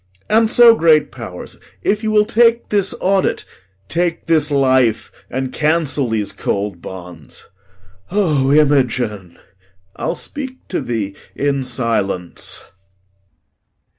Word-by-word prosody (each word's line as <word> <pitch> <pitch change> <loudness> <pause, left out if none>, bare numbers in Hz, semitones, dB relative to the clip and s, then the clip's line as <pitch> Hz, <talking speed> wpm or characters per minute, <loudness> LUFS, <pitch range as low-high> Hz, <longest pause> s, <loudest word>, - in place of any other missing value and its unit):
And 220 +1 +4
so, 235 0 +7
great 160 -7 +3
pow'rs, 110 -8 -9 0.2
If 210 +1 +1
you 220 - -1
will 210 -1 +4
take 230 +1 +3
this 200 -2 +1
audit, 190 0 +1 0.4
take 170 - -1
this 155 -2 +2
life, 130 -5 +2 0.2
And 130 0 -3
cancel 150 -4 0
these 105 -3 -1
cold 100 -2 -3
bonds. 90 -6 -10 0.6
O 155 -9 +1
Imogen! 125 - +1 0.6
I'll - - -2
speak 265 -3 -7
to 185 - -2
thee 105 -5 -3 0.2
in 140 -1 0
silence. 115 -8 -3
140 Hz, 110 wpm, -18 LUFS, 110-190 Hz, 0.6 s, so